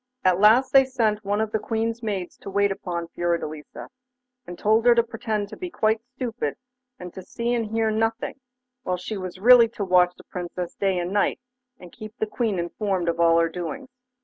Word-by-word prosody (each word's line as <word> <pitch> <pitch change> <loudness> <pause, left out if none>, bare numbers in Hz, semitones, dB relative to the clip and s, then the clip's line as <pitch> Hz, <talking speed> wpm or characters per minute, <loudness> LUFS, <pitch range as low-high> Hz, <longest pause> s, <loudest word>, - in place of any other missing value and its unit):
At 185 -1 +4
last 225 +6 +5
they 270 -1 +8
sent 225 -5 0
one 205 +1 -1
of 220 -1 -2
the 220 - 0
Queen's 225 +1 -2
maids 200 -6 -4
to - - -9
wait 200 0 +2
upon 170 -3 -4
Fiordelisa, 165 -3 -4 0.6
and 175 - -8
told 220 +2 +2
her 240 - +7
to 235 - +4
pretend 225 -3 -3
to - - -8
be 360 - -6
quite 220 -8 +1
stupid, 245 -3 -3 0.4
and 180 -1 -9
to 190 - -8
see 235 +5 -3
and 230 -2 -1
hear 225 0 0
nothing, 225 +4 -1 0.4
while 180 -6 -2
she 195 +4 -5
was 185 -2 -6
really 235 +3 +7
to 220 -3 -5
watch 180 -1 +4
the - - -16
Princess 180 0 -6
day 195 -2 0
and 175 +2 -2
night, 205 - +1 0.4
and 180 -1 -12
keep 215 +1 -11
the - - 0
Queen 215 -2 -2
informed 180 0 -1
of 170 0 -2
all 165 0 +5
her 165 0 +3
doings. 180 - -6
210 Hz, 200 wpm, -24 LUFS, 180-225 Hz, 0.6 s, they